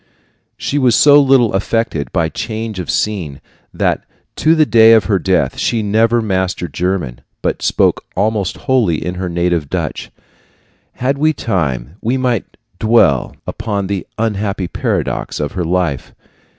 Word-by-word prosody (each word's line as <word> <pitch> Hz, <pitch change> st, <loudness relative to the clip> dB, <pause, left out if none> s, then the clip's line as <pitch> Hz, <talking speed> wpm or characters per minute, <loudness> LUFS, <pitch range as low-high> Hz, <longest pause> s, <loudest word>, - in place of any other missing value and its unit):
She 145 Hz, -, -1 dB
was 125 Hz, -4 st, +3 dB
so 145 Hz, 0 st, +7 dB
little 130 Hz, -5 st, +3 dB
affected 95 Hz, -, -1 dB
by 80 Hz, -, +1 dB
change 110 Hz, +4 st, -5 dB
of 90 Hz, -, -5 dB
scene 90 Hz, -10 st, -2 dB, 0.3 s
that -, -, -1 dB, 0.3 s
to 160 Hz, +1 st, +3 dB
the 155 Hz, -1 st, +4 dB
day 115 Hz, -3 st, +6 dB
of 110 Hz, -2 st, +5 dB
her 100 Hz, -1 st, +1 dB
death 95 Hz, -1 st, 0 dB
she 115 Hz, -2 st, 0 dB
never 115 Hz, +3 st, +2 dB
mastered 95 Hz, -5 st, -2 dB
German, 85 Hz, -8 st, -2 dB, 0.2 s
but -, -, -1 dB
spoke -, -, +1 dB
almost 100 Hz, -1 st, 0 dB
wholly 120 Hz, -, +1 dB
in 90 Hz, -, -2 dB
her 90 Hz, 0 st, -4 dB
native 85 Hz, -3 st, -1 dB
Dutch. -, -, -3 dB, 0.8 s
Had 135 Hz, +3 st, -1 dB
we 155 Hz, +1 st, +3 dB
time, 80 Hz, -, -2 dB
we 120 Hz, +4 st, 0 dB
might 125 Hz, -3 st, 0 dB, 0.3 s
dwell 110 Hz, -, +3 dB
upon 105 Hz, -3 st, -3 dB
the 95 Hz, -2 st, -3 dB
unhappy 105 Hz, -4 st, -1 dB
paradox -, -, -2 dB
of 75 Hz, -, -2 dB
her 90 Hz, -, -3 dB
life. 85 Hz, -6 st, -2 dB
100 Hz, 150 wpm, -16 LUFS, 90-115 Hz, 0.8 s, so